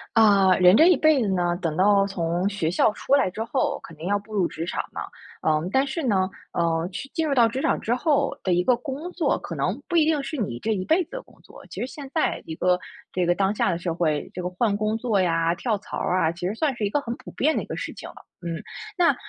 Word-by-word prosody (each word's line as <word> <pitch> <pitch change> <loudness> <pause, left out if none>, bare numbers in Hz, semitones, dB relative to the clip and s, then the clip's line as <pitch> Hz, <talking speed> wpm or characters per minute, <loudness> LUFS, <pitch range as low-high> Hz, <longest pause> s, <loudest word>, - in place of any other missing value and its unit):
啊， 200 -4 +6
人 180 +1 +7
这 320 +8 +7
一 360 - +5
辈 310 -4 +4
子 220 - 0
呢， 175 -2 +1
等 165 -4 -2
到 200 +1 +4
从 175 0 -1
学 200 -6 -1
校 185 - +3
出 260 - -2
来 280 - +2
之 215 +5 -4
后， 230 - -1
肯 165 - -11
定 160 +3 -7
要 205 +1 +2
步 205 +2 -11
入 190 -4 +2
职 165 - -5
场 - - -2
嘛。 - - -5 0.4
嗯， 155 +2 +1
但 265 +4 +3
是 280 +4 -3
呢， 190 -7 +1 0.2
呃， 165 -1 0
去 185 - -6
进 325 -1 0
入 285 - +1
到 235 -3 +6
职 255 +4 -3
场 - - +1
之 230 - -1
后 285 +3 +1
的 185 - 0
一 175 +1 +2
个 250 - +4
工 280 +7 -6
作， 350 -2 0
可 - - -7
能 - - -2
不 345 - -3
一 320 -2 +5
定 310 -2 +1
是 310 - -5
你 205 - -3
这 225 - -2
一 190 -3 -2
辈 325 - +2
子 - - -39
的 - - -5
工 - - -23
作。 - - -15
其 - - -9
实 - - -1
现 275 0 -9
在 320 - 0
一 160 - -6
个 180 +2 +2 0.4
这 180 -1 +1
个 175 0 +2
当 195 +2 +1
下 - - +1
的 170 - -1
社 170 -1 -3
会， 155 -3 -1
这 180 - -5
个 180 - -2
换 200 +3 0
工 215 +1 0
作 225 -4 +1
呀、 165 -1 +2
跳 215 +4 -1
槽 200 - -7
儿 185 - 0
啊， 160 -1 +2
其 175 +1 -6
实 200 - -3
算 280 +1 0
是 220 - -2
一 - - 0
个 290 - +1
很 235 -4 -5
普 - - -12
遍 310 +3 +1
的 - - 0
一 - - -8
个 - - -6
事 - - -5
情 - - -9
了， - - -14 0.3
嗯。 170 -1 -4 0.4
那 350 -2 +4
200 Hz, 300 characters per minute, -24 LUFS, 175-265 Hz, 0.4 s, 人